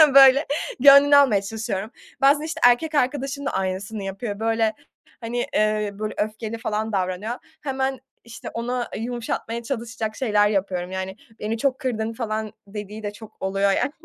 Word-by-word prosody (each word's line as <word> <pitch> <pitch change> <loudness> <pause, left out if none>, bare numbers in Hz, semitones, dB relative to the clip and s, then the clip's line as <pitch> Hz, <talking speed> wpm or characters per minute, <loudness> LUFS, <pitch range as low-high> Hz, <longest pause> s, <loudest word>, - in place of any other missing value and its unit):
böyle 275 +1 +8 0.3
gönlünü 280 +2 +8
almaya 250 -9 +5
çalışıyorum. 215 0 -4 0.3
Bazen, 285 +2 +5
işte, 320 0 -4
erkek 305 +6 +2
arkadaşım 280 +1 0
da - - 0
aynısını 190 +2 -3
yapıyor, 200 +2 -5
böyle, 225 0 +1 0.5
hani, 240 +1 -2
eee, 215 -1 +1
böyle 215 +1 -4
öfkeli 215 +1 -3
falan 220 0 -2
davranıyor, 190 +4 -2 0.3
hemen, 265 -2 -2 0.2
işte, 230 0 -9
onu 245 +2 -2
yumuşatmaya 235 0 -3
çalışacak 230 -3 -4
şeyler 210 -5 +2
yapıyorum. 185 -3 -1
Yani, 190 +1 -4 0.2
"Beni 220 +2 -2
çok 265 +2 0
kırdın," 230 -5 -2
falan 220 -2 -3
dediği 210 +1 -7
de 205 0 -4
çok 220 0 -14
oluyor 195 +1 +1
yani. 235 - +1
225 Hz, 150 wpm, -23 LUFS, 205-255 Hz, 0.5 s, böyle